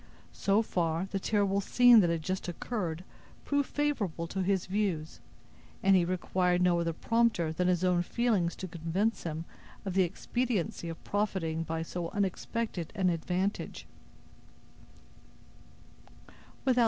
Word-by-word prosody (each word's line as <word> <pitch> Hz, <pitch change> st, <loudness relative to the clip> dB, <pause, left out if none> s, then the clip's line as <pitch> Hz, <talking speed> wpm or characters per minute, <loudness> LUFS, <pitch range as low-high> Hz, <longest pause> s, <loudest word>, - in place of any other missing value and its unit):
So 200 Hz, +3 st, +2 dB
far, 170 Hz, -3 st, 0 dB
the 195 Hz, -, -1 dB
terrible 200 Hz, -1 st, +1 dB
scene 245 Hz, +3 st, +7 dB
that 175 Hz, -4 st, +4 dB
had 165 Hz, -1 st, -1 dB
just 185 Hz, +3 st, -3 dB
occurred 175 Hz, -2 st, -3 dB, 0.4 s
proved 285 Hz, -1 st, +1 dB
favorable 225 Hz, -, -1 dB
to 190 Hz, -, -2 dB
his 190 Hz, 0 st, +1 dB
views, 185 Hz, -6 st, -2 dB, 0.6 s
and 195 Hz, 0 st, +6 dB
he 180 Hz, -2 st, +4 dB
required 180 Hz, 0 st, +1 dB
no 180 Hz, -1 st, +3 dB
other 170 Hz, 0 st, 0 dB
prompter 225 Hz, -4 st, +1 dB
than 180 Hz, +2 st, 0 dB
his 180 Hz, -1 st, +2 dB
own 180 Hz, -1 st, +3 dB
feelings 200 Hz, -3 st, +1 dB
to 185 Hz, -, -6 dB
convince 175 Hz, +6 st, -1 dB
him 160 Hz, 0 st, -4 dB, 0.4 s
of 190 Hz, -, -2 dB
the 190 Hz, -, +4 dB
expediency 190 Hz, -1 st, -1 dB
of 165 Hz, -, -8 dB
profiting 190 Hz, -6 st, -1 dB
by 165 Hz, 0 st, -2 dB
so 170 Hz, 0 st, -4 dB
unexpected 200 Hz, -1 st, -2 dB
an 185 Hz, -2 st, +2 dB
advantage. 180 Hz, +4 st, -2 dB
185 Hz, 130 wpm, -30 LUFS, 170-205 Hz, 0.6 s, scene